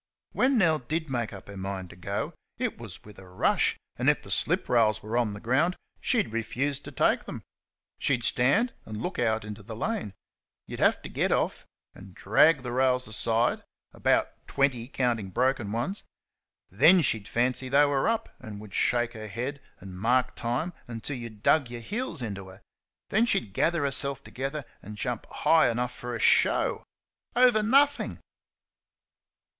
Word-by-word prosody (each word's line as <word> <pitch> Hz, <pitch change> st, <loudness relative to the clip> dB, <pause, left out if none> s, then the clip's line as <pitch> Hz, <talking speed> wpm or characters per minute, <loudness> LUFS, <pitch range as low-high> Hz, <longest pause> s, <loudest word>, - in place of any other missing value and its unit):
When 260 Hz, 0 st, +2 dB
Nell 165 Hz, -7 st, +3 dB
DID 155 Hz, +4 st, -3 dB
make 120 Hz, -3 st, -1 dB
up 100 Hz, -2 st, -11 dB
her 100 Hz, -, -9 dB
mind 95 Hz, -1 st, -5 dB
to -, -, -13 dB
go, 100 Hz, +3 st, -4 dB, 0.2 s
it -, -, -3 dB
was -, -, -9 dB
with 105 Hz, -2 st, -13 dB
a 95 Hz, -1 st, -14 dB
rush, 90 Hz, -, +1 dB, 0.2 s
and, -, -, +3 dB
if -, -, +1 dB
the -, -, -7 dB
slip -, -, +1 dB
rails 110 Hz, -4 st, +2 dB
were 110 Hz, +2 st, -4 dB
on 120 Hz, -4 st, +1 dB
the 100 Hz, -, -7 dB
ground, 145 Hz, -, +1 dB, 0.2 s
she'd 215 Hz, -, +1 dB
refuse 135 Hz, +5 st, -1 dB
to -, -, -10 dB
take -, -, +1 dB
them. -, -, -7 dB, 0.6 s
She'd 125 Hz, -4 st, +1 dB
stand 140 Hz, -, +2 dB
and 110 Hz, -1 st, -7 dB
look 180 Hz, -, -4 dB
out 110 Hz, -2 st, +1 dB
into 105 Hz, -1 st, -8 dB
the 110 Hz, +3 st, -8 dB
lane. 190 Hz, -, -3 dB, 0.5 s
You'd -, -, -8 dB
have -, -, +3 dB
to -, -, -6 dB
get -, -, 0 dB
off -, -, 0 dB, 0.3 s
and 95 Hz, -1 st, -14 dB
drag 140 Hz, +8 st, +4 dB
the 125 Hz, -, -4 dB
rails 125 Hz, 0 st, +2 dB
aside 115 Hz, +2 st, +1 dB, 0.3 s
(about -, -, 0 dB
twenty, 130 Hz, -4 st, 0 dB
counting 120 Hz, -7 st, -1 dB
broken 125 Hz, -1 st, 0 dB
ones). 120 Hz, -, -3 dB, 0.7 s
Then 185 Hz, 0 st, +6 dB
she'd 110 Hz, -7 st, 0 dB
fancy 125 Hz, +2 st, 0 dB
they 140 Hz, +2 st, +5 dB
were 140 Hz, +2 st, +1 dB
up, 230 Hz, -1 st, -1 dB
and 105 Hz, -2 st, -9 dB
would 105 Hz, -2 st, -11 dB
shake 120 Hz, -1 st, +1 dB
her 110 Hz, -2 st, -7 dB
head 125 Hz, +7 st, -4 dB, 0.2 s
and 95 Hz, -1 st, -10 dB
mark 125 Hz, +4 st, +2 dB
time 125 Hz, +9 st, -2 dB
until 120 Hz, +4 st, -5 dB
you 120 Hz, -1 st, -6 dB
dug 120 Hz, +5 st, +2 dB
your 120 Hz, 0 st, -6 dB
heels 195 Hz, -, -3 dB
into 100 Hz, -4 st, -5 dB
her; 95 Hz, +1 st, -13 dB, 0.5 s
then 225 Hz, +4 st, +3 dB
she'd 110 Hz, -, 0 dB
gather 165 Hz, +6 st, +1 dB
herself 140 Hz, -1 st, -1 dB
together 135 Hz, +2 st, -5 dB, 0.2 s
and 105 Hz, +2 st, -9 dB
jump 120 Hz, 0 st, -3 dB
high 160 Hz, -5 st, +3 dB
enough 125 Hz, +1 st, -2 dB
for 120 Hz, 0 st, -5 dB
a -, -, -4 dB
show -, -, +3 dB, 0.5 s
over 245 Hz, -3 st, +5 dB
nothing! 280 Hz, +6 st, +3 dB
120 Hz, 175 wpm, -27 LUFS, 110-145 Hz, 0.7 s, Then